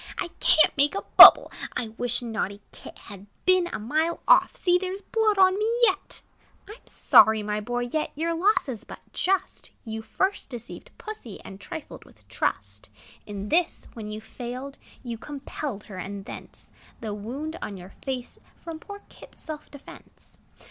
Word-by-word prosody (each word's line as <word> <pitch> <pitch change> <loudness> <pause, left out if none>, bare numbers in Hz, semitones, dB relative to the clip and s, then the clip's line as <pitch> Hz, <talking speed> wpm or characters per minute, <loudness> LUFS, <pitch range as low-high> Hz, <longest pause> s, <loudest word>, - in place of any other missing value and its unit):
"I - - -3
can't 315 - +5
make 285 +5 +2
a 395 - -3
bubble! - - +11 0.3
I 230 - -3
wish 245 +2 -1
naughty 210 -3 -3
Kit - - -12
Had 200 0 -12 0.2
been 370 -1 +4
a 350 - -4
mile 310 +10 -1
off: - - +5
See! 355 0 +2
there 375 +1 -4
's - - -18
blood 435 -1 +1
on 380 +1 +5
me 435 +2 +1
yet!" 390 -4 +2 0.4
I - - -10
'm 460 - -19
sorry, 220 -1 +5
my 210 0 -2
boy; 245 +3 -2
yet 275 +6 -2
Your 330 +3 -1
loss 375 +4 +2
is 235 -4 -6
but - - -11
just; 385 +1 -1
You 220 -1 -5
first 380 - -2
deceived 240 -2 -9
Pussy, 425 - -8
And 195 +1 -11
trifled 320 - -8
with - - -22
trust. - - -3 0.4
In 205 0 -6
this, 345 +1 0
when 220 -2 -7
you 215 +1 -6
failed, 255 +5 -8 0.2
You 235 -3 -6
compelled 275 -5 -6
her; 195 - -10
and 195 +2 -6
thence - - -11 0.3
The 215 -2 -4
wound 275 +11 -6
on 200 - -5
your 180 +1 -12
face, 255 -2 -5 0.2
From 330 -2 -7
poor 405 +4 -10
Kit's - - -15
self 305 -1 -7
defence. 285 -1 -15
270 Hz, 175 wpm, -26 LUFS, 220-350 Hz, 0.4 s, bubble